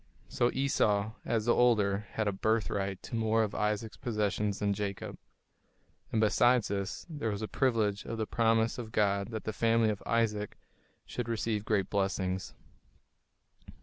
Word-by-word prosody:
So 120 - +1
Esau, 110 -6 +1
as 110 -2 0
the 120 - +4
older, 105 -4 +3
had 110 -1 -1
a - - +2
"birthright" 100 -2 -1
to - - -6
more 110 0 +2
of 105 -1 -3
Isaac's 105 +1 -1
possessions 105 -3 -1
than 100 -1 +1
Jacob. 100 -1 -4 1.0
And 110 - +1
besides 115 +2 +4
this, 100 -1 -3
there 145 -9 -3
was 105 0 -3
the 110 - -2
privilege 110 -7 +1
of 115 - -4
the 110 - -1
promise 115 +1 +2
of 110 -2 -6
God 100 -2 +1
that 110 -2 -5
the 110 - -3
family 115 0 +3
of 105 - -5
Isaac 105 -3 0 0.5
should 120 -2 -4
receive 110 -2 -1
great 100 -4 0
blessings. 95 -2 -1
110 Hz, 155 wpm, -31 LUFS, 100-115 Hz, 1.0 s, the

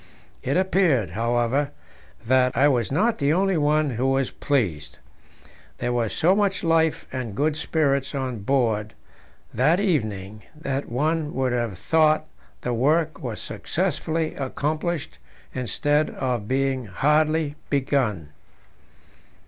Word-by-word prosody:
It 135 +6 0
appeared, 180 - +2
however, 120 +6 0 0.6
that 125 0 +3
I 140 +3 +5
was 125 -5 +1
not 215 +11 +1
the 140 0 +2
only 195 +2 +2
one 150 -1 +2
who 125 +3 -1
was 135 -1 +1
pleased. 90 - -1 0.8
There 120 - -1
was 115 -3 0
so 180 +4 +3
much 200 -2 +1
life 165 -1 +2
and 120 -6 -4
good 150 +5 +1
spirits 140 -3 0
on 130 -4 -3
board 110 -2 0 0.6
that 150 - +3
evening 110 - -1 0.2
that 140 -2 -3
one 150 +5 -1
would 130 -2 0
have 120 -6 -2
thought 155 - +3 0.4
the 125 - -2
work 155 +5 +1
was 120 -5 -5
successfully 160 0 -2
accomplished 155 +4 -3 0.3
instead 145 +4 0
of 125 -6 -3
being 130 -1 0
hardly 150 - +2 0.2
begun. 130 - 0
135 Hz, 125 wpm, -24 LUFS, 120-155 Hz, 0.8 s, I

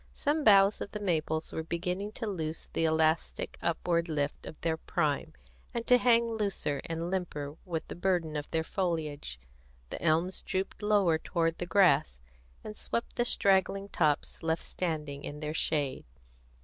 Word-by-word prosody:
Some 300 +1 0
boughs 200 -2 +6
of - - -5
the 210 - -3
maples 160 -5 -1
were - - -3
beginning 180 +5 -3
to 230 - -4
lose 165 -6 -4
the 165 - +1
elastic 160 0 +1
upward 170 0 0
lift 145 -2 -2
of 155 - -9
their 165 -1 +1
prime, 155 -3 -1 0.4
and 235 -1 -1
to 250 0 +6
hang 235 -1 +5
looser 205 -10 -1
and 165 +1 -3
limper 150 -6 -3
with 165 -3 -3
the - - -6
burden 175 -3 0
of 150 0 -4
their 160 0 0
foliage. 155 - -2 0.5
The - - -5
elms 170 +3 +1
drooped 190 +2 -3
lower 200 -6 +3
toward 165 -1 -1
the 175 - -3
grass, 155 - +4 0.4
and 210 - -7
swept 235 - -3
the 240 - +1
straggling 195 -2 +2
tops 150 -6 0
left 160 0 0
standing 150 -5 -3
in 150 - -6
their 150 0 -3
shade. 150 -4 -1
170 Hz, 160 wpm, -30 LUFS, 155-195 Hz, 0.5 s, boughs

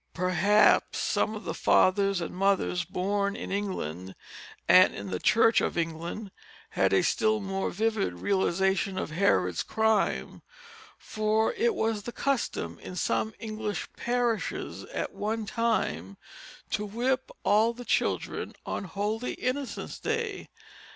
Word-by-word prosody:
Perhaps 185 +4 +3
some 215 - 0
of 215 - -7
the - - -3
fathers 195 0 +3
and 165 - -4
mothers 190 -2 +1
born 200 +3 -1
in - - -6
England 95 - -3 0.5
and - - +7
in 100 -1 -6
the 90 - -2
Church 225 - +4
of - - -1
England 170 +5 -3 0.4
had - - +2
a - - +4
still 215 0 +2
more 195 -1 -2
vivid 215 - 0
realization 190 - +1
of 175 - -3
Herod's 95 - +2
crime, 220 -2 0 0.6
for 215 - 0
it 460 -1 +1
was 220 -7 0
the 240 - -6
custom 235 - -2
in 180 - -8
some 110 -9 -1
English 215 -2 -4
parishes 240 -2 -2
at - - -4
one 220 +1 -2
time 200 - -1 0.5
to 210 - 0
whip 245 +5 -1
all 215 +3 +4
the 245 +1 -10
children - - -1
on - - -3
Holy 210 +6 -2
Innocent's 260 +1 -3
Day. 445 -3 -2
205 Hz, 130 wpm, -28 LUFS, 180-225 Hz, 0.6 s, and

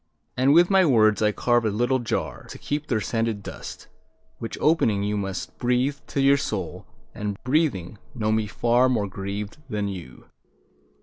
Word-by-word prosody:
And 130 +2 +3
with 175 +5 +5
my 190 -1 +6
words 110 -8 +4
I 105 0 +3
carve 120 +2 +2
a 110 - +1
little 120 +5 +1
jar 120 - -3
To - - -8
keep 150 +1 -3
their 110 - +1
scented 115 0 -1
dust, - - -8 0.5
Which, 115 - -5
opening, 115 -11 +2
you 105 +1 -1
must 95 -2 -4
Breathe 125 +3 +1
to - - -3
your 140 +1 +5
soul, 95 -9 -4 0.3
and, 105 -1 -4
breathing, 125 - 0 0.2
know 110 -3 0
me 110 -1 +1
far 120 +4 +2
More 110 -5 0
grieved 100 +3 -5
than 105 -1 -1
you. 85 -10 -9
115 Hz, 170 wpm, -24 LUFS, 105-130 Hz, 0.5 s, my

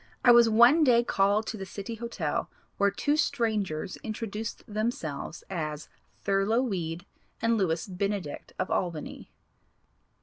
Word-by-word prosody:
I 245 - +9
was 235 -1 +7
one 240 +8 +6
day 240 -4 +5
called 205 0 +2
to 220 - -4
the 195 - -5
City 200 +5 -6
Hotel 235 +1 -3 0.3
where 200 0 +4
two 290 +9 0
strangers 215 - -1
introduced 220 0 -5
themselves 205 - -3
as 155 -5 -4 0.3
Thurlow 200 +5 +2
Weed 175 -6 -3 0.3
and 230 0 +2
Lewis 170 -6 0
Benedict, 195 -4 -3
of - - -2
Albany. 170 -4 -3
205 Hz, 130 wpm, -28 LUFS, 180-230 Hz, 0.3 s, I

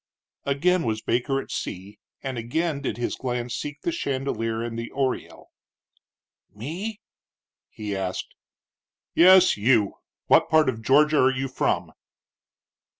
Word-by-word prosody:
Again 170 +6 +2
was 110 -4 -2
Baker 125 +3 0
at - - -8
sea, 100 +3 -6 0.2
and 130 -3 -3
again 145 +6 -1
did 135 - -3
his 120 - -2
glance 125 -2 -3
seek 145 0 -5
the 340 - -1
chandelier 130 - -2
and 120 -1 -4
the 115 - -5
oriel. 135 -2 -3 1.0
"Me?" 180 - -5 0.7
he 105 -2 -5
asked. 95 -1 -4 0.8
"Yes, 185 -2 +7
you. 105 -2 +2 0.3
What - - +4
part 155 -2 +4
of 115 -3 -4
Georgia 150 +6 +4
are 130 - +5
you 135 +1 -2
from?" 130 - -1
130 Hz, 130 wpm, -25 LUFS, 115-150 Hz, 1.0 s, Yes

